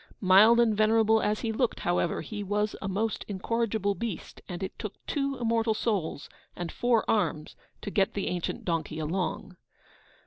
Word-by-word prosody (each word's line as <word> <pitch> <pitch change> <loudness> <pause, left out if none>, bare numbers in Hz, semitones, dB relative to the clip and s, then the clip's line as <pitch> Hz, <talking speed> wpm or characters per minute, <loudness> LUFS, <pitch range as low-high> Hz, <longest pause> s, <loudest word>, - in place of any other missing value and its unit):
Mild 205 +5 +6
and 225 -3 +4
venerable 220 +1 +4
as 210 0 0
he 230 - -1
looked, 235 +2 -1
however, 175 -1 0
he 210 -2 -6
was 210 +1 -1
a 195 - -3
most 210 +3 -1
incorrigible 210 0 -1
beast, 215 -4 -6
and 180 +1 -5
it 190 - -6
took 215 -3 -5
two 275 -1 -1
immortal 225 -1 +1
souls, 195 -11 -2 0.3
and 175 -1 -5
four 240 -2 +1
arms, 165 -8 0 0.3
to 205 - -4
get 195 -1 +1
the 200 - -1
ancient 180 -2 -3
donkey 165 -3 -2
along. 180 +3 -3
210 Hz, 165 wpm, -28 LUFS, 185-225 Hz, 0.3 s, Mild